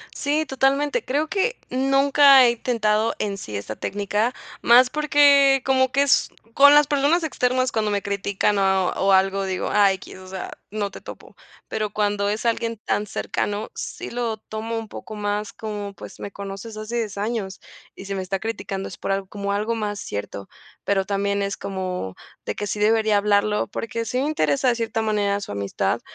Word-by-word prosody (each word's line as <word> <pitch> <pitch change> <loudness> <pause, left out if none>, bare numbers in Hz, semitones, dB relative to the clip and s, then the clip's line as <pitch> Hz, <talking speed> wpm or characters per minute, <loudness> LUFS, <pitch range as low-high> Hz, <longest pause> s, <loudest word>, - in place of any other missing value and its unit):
Sí, 295 +2 0
totalmente, 275 - +1
creo 290 +4 0
que 415 +8 0
nunca 275 +1 +5
he 240 - +5
intentado 225 -2 0
en 200 -2 -2
sí 105 - -7
esa 100 +2 -5
técnica, 205 - -1 0.3
más 250 +2 +6
porque 285 -2 +5
como 260 -1 +3
que 275 - +2
es 280 -2 +3 0.3
con 285 +1 +8
las 295 -1 +6
personas 295 +4 +2
externas 255 -4 0
cuando 215 -1 0
me 200 -1 0
critican 200 0 0
o 190 -1 +2
o 195 0 +1
algo, 195 +1 +2
digo: 190 -1 -2
"Ah, 200 -2 +5
X", 190 - -10
o 185 0 -12
sea, 190 0 -6 0.2
"No 205 -1 -2
te - - -10
topo", - - -12 0.3
pero 215 -1 -2
cuando 205 -1 0
es 210 +3 -2
alguien 230 0 0
tan 210 - 0
cercano 205 +1 -3
sí - - -6
lo 235 -2 -2
tomo 220 +1 -5
un 225 -1 -5
poco 215 - -8
más 205 0 -3
como: 205 -2 -6
"Pues - - -11
me 200 - -6
conoces 200 +3 -7
hace 215 +2 -4
10 215 -4 -3
años 205 -2 -3 0.4
y 190 - -10
si 195 0 -4
me 190 - -2
está 190 +1 -3
criticando 200 -3 -4
es - - -10
por - - -3
al 195 -1 -2
como 200 -1 -3
algo 215 +3 -1
más 205 -2 -3
cierto", 100 -1 -6 0.3
pero 195 -1 +1
también 200 0 -1
es 200 0 -2
como 185 - -4 0.3
de - - -3
que 205 - -4
sí 205 - -3
debería 215 0 +3
hablarlo 210 +1 +2
porque 230 +2 -4
sí 250 +3 -1
me 275 - 0
interesa 155 - +1
de 240 - +2
cierta 225 -1 -2
manera 205 -2 0
su 200 - -7
amistad, 100 -1 -1
215 Hz, 190 wpm, -23 LUFS, 200-250 Hz, 0.4 s, con